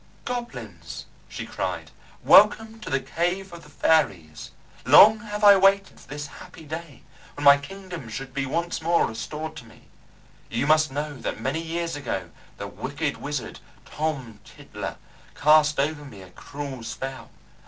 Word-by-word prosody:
"Goblins," 240 -1 -6 0.2
she - - -6
cried, - - -4 0.3
"welcome 225 0 +5
to 215 - -8
the 135 - +1
cave 175 +2 -2
of 170 - -9
the 150 - -16
fairies. 95 - 0 0.3
Long 215 +1 +8
have 210 -1 -6
I 205 -1 +9
waited 195 +1 +3
for - - -17
this 145 +2 -6
happy 160 - -12
day, 160 -1 -8 0.3
when 145 - -6
my 140 0 +9
kingdom 180 -3 -9
should 135 +3 -7
be 135 0 -2
once 170 +4 -2
more 170 +1 +3
restored 155 +7 -5
to 120 - -10
me. 115 - -19 0.6
You - - -1
must 155 0 +4
know 145 +1 -4
that - - -4
many 135 +8 -2
years 165 0 -3
ago 95 -11 -4 0.3
the - - -5
wicked 145 +2 -4
wizard, 145 -3 -5 0.3
Tom 135 -8 -4
Tiddler, - - -8 0.4
cast 150 -1 +4
over 145 +1 0
me 105 -9 -11
a 90 - -15
cruel 140 +3 -7
spell. 130 +3 -6
150 Hz, 155 wpm, -25 LUFS, 135-170 Hz, 0.6 s, I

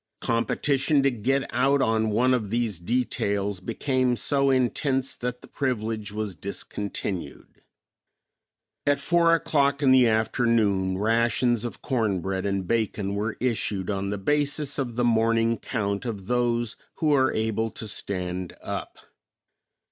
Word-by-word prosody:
Competition 135 +4 +1
to 135 - +3
get 130 +4 0
out 140 +1 +3
on 110 -3 +2
one 125 +5 +3
of 110 -5 -1
these 115 -5 -1
details 100 -2 -1
became 125 +5 0
so 140 +2 +1
intense 130 +1 +1
that 125 0 -5
the - - -12
privilege 110 -5 -2
was 105 -1 -3
discontinued. 95 -2 -5 1.3
At 145 0 +3
four 170 +2 +4
o'clock 140 -3 +1
in 135 - +5
the 130 -2 +6
afternoon 110 -4 +1
rations 115 +2 +2
of 120 - -7
corn 110 -8 0
bread 95 +2 -2
and 95 -2 -2
bacon 105 -3 -1
were 105 +2 -2
issued 105 -5 -1
on 100 0 -2
the 105 - -2
basis 145 +4 0
of 120 -4 -3
the 120 0 +1
morning 115 0 +2
count 100 -2 -2
of 105 -5 -5
those 120 0 0 0.2
who 155 -2 +2
are 130 -2 +3
able 110 0 -1
to 110 - -7
stand 90 -3 -3
up. - - -6
115 Hz, 140 wpm, -25 LUFS, 100-130 Hz, 1.3 s, the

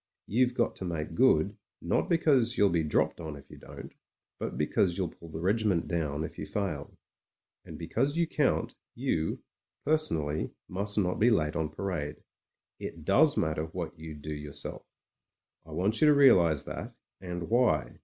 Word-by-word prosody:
You've 125 +3 +2
got 120 - +1
to - - -6
make 85 -4 -3
good, - - +4 0.2
not - - 0
because 140 -8 +3
you'll 100 -1 +4
be' 85 -1 +2
dropped 75 +2 0
on 80 -2 -5
if 70 - -14
you - - -11
don't, - - -10 0.5
but - - -4
because 90 -3 +1
you'll 95 -3 0
pull 85 - -13
the 80 - -6
regiment 100 -1 +1
down 80 -3 -1
if - - -7
you - - -5
fail. 95 -9 -3 0.7
And - - -9
because 140 +6 -1
you 170 - +3
count, - - 0 0.2
you, 80 0 -1 0.4
personally, 80 - 0 0.2
must 100 +3 -2
not 90 -3 +1
be 115 - +5
late 80 -8 +1
on 80 -2 -1
parade. 80 -7 -3 0.6
It 80 -2 -7
does 145 - +4
matter 80 0 0
what 85 +1 -5
you 80 -1 -7
do 75 +1 -6
your 75 -1 -7
self. - - -4 0.9
I - - -13
want 100 +5 0
you 155 - +7
to 150 - +6
realise 90 - +5
that, - - -6 0.3
and 90 -2 -5
why. 120 0 +2
90 Hz, 175 wpm, -30 LUFS, 80-115 Hz, 0.9 s, you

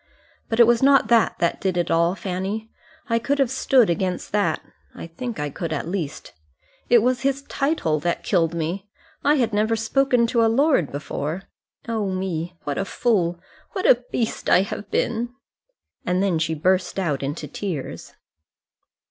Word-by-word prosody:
But 225 - -1
it 235 - +9
was 235 0 +3
not 275 0 +5
that 235 -2 +3
that 170 - 0
did 185 -2 0
it 175 - 0
all, 170 +2 +3
Fanny. 195 +4 -4 0.4
I 230 -1 +2
could 280 +5 0
have 270 -3 +2
stood 265 -3 +4
against 180 +1 -2
that. 200 -6 +1 0.4
I - - -7
think 220 +6 -6
I 150 -1 -2
could 165 +3 -4
at 155 0 -2
least. 170 -5 -4 0.6
It 235 -3 +6
was 250 +1 +1
his 275 0 0
title 275 - 0
that 170 +3 -2
killed 170 -4 +1
me. 175 +5 -3 0.3
I 290 +1 +4
had 235 -6 +1
never 215 +2 +2
spoken 245 +2 +2
to 230 0 +2
a 225 - +4
lord 265 - +2
before. 150 +4 -4 0.4
Oh, 220 -4 -1
me! 180 -2 -3
what 145 -1 -2
a 195 - -1
fool, 180 -7 0 0.3
what 380 -3 -3
a 245 0 +5
beast 230 -2 -2
I 185 - +5
have 205 0 -6
been!" 240 +3 -1 0.7
And 180 +2 +1
then 180 -5 +1
she 160 0 0
burst 185 +4 +1
out 160 -8 -1
into 145 +2 -4
tears. 160 -2 -5
195 Hz, 175 wpm, -23 LUFS, 170-235 Hz, 0.7 s, it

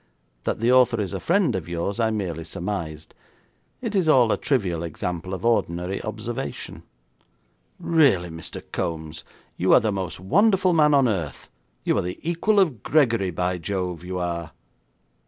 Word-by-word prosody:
That - - -1
the 120 +2 +3
author 125 -2 +4
is 95 -5 -2
a - - -2
friend 170 - +2
of 85 -3 -4
yours, 85 +5 -2
I 115 -1 +2
merely 90 -7 -3
surmised. 85 -3 -5 0.7
It 225 -3 -2
is 185 -6 +2
all 125 -6 +5
a - - +3
trivial 95 - 0
example 85 +2 -4
of 95 +4 -4
ordinary 90 -5 0
observation.' 110 - -5 1.0
'Really, 135 - +3
Mr. 80 0 -8
Kombs, 80 -1 -4 0.3
you - - +3
are - - +8
the 110 0 0
most 95 -4 -4
wonderful 185 - +3
man 150 -2 +5
on 135 -2 +4
earth. 85 -10 -3 0.3
You - - +1
are - - +1
the 90 +1 -5
equal 185 +5 +2
of 155 - +2
Gregory, 115 -11 +2
by 90 +1 -1
Jove, 90 -1 -3
you 90 +1 -4
are.' 85 -2 -3
100 Hz, 160 wpm, -24 LUFS, 85-130 Hz, 1.0 s, are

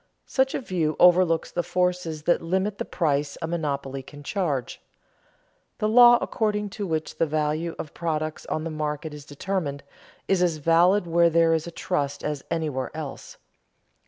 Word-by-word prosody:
Such 265 0 +1
a - - 0
view 170 - -1
overlooks 175 -2 +4
the 175 - 0
forces 180 -3 -1
that 175 - +2
limit 190 +4 -1
the - - -2
price 145 -4 -1
a 165 - -3
monopoly 140 -5 -3
can 145 +2 -13
charge. 150 -7 -2 1.0
The 215 - 0
law 240 +2 +8
according 210 -2 -1
to 205 -1 -4
which 160 -2 -3
the 165 - +3
value 155 +2 -1
of 150 - -7
products 155 -2 -3
on 155 - -2
the 165 - -4
market 150 0 -3
is 145 -1 -10
determined, 145 -2 -3 0.4
is 195 -2 +2
as 170 -3 +2
valid 170 +5 +4
where 170 0 +4
there 165 0 +4
is 160 +1 -1
a - - -6
trust 145 -5 -2
as 150 -2 -3
anywhere 150 -6 -2
else. 150 -4 -7
165 Hz, 165 wpm, -25 LUFS, 150-180 Hz, 1.0 s, law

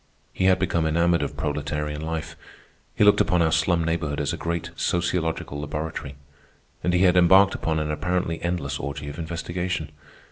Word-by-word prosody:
He 95 - -1
had 95 0 +5
become 85 -3 0
enamoured 85 +2 +2
of - - -4
proletarian 75 0 -3
life. 80 0 -4 0.6
He - - +3
looked 105 0 +6
upon 90 -2 +2
our 80 - +2
slum 85 +1 +2
neighborhood 80 -3 -1
as 75 - -1
a - - -1
great 85 0 -3
sociological 85 -5 -1
laboratory, 75 -1 -5 0.7
and 90 - +1
he 90 +1 +3
had 90 -1 +5
embarked 95 +2 +6
upon 80 -1 -1
an 75 -1 -1
apparently 90 +1 -1
endless 75 -6 -2
orgy 70 0 -5
of 70 +3 -8
investigation. 85 -1 -3
80 Hz, 170 wpm, -24 LUFS, 75-90 Hz, 0.7 s, looked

